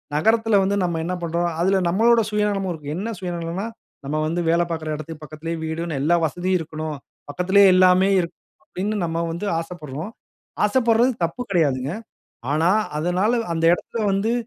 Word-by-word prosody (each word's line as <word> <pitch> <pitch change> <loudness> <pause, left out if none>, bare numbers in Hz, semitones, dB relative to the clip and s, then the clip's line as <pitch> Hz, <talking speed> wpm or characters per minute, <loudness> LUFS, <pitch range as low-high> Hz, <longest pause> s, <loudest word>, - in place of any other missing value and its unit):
நகரத்தில 220 +5 +3
வந்து 195 +1 +1
நம்ம 170 -2 -1
என்ன 180 +2 -2
பண்றோம். 170 +1 -1
அதுல 190 +2 +3
நம்மளோட 230 +6 +4
சுயநலமும் 210 -3 0
இருக்கு. 150 -2 -6
என்ன 215 +6 -3
சுயநலன்னா, 175 +1 -4 0.4
நம்ம 150 +2 -2
வந்து 170 +2 -1
வேலை 170 +1 +3
பார்க்கிற 160 -2 -4
இடத்துக்கு 155 0 -8
பக்கத்திலே 155 +2 -6
'வீடுன்னு 160 -1 -3
எல்லா 165 +5 +3
வசதியும் 180 +4 0
இருக்ணும். 155 -1 -5 0.3
பக்கத்திலே 185 +7 +3
எல்லாமே 185 +1 +5
இருக்கணும்.' 170 -1 -7
அப்பிடின்னு 205 +3 -3
நம்ம 165 +1 -2
வந்து 175 +5 -4
ஆசைப்படுறோம். 165 +2 -7 0.5
ஆசைப்படுறது 235 +2 +3
தப்பு 170 +9 -6
கிடையாதுங்க. 145 -5 +1 0.6
ஆனா, 160 +4 +3 0.3
அதனால 180 +7 +1 0.2
அந்த 165 0 -1
இடத்துல 225 +4 -5
வந்து 210 +4 +1
175 Hz, 150 wpm, -22 LUFS, 160-200 Hz, 0.6 s, எல்லாமே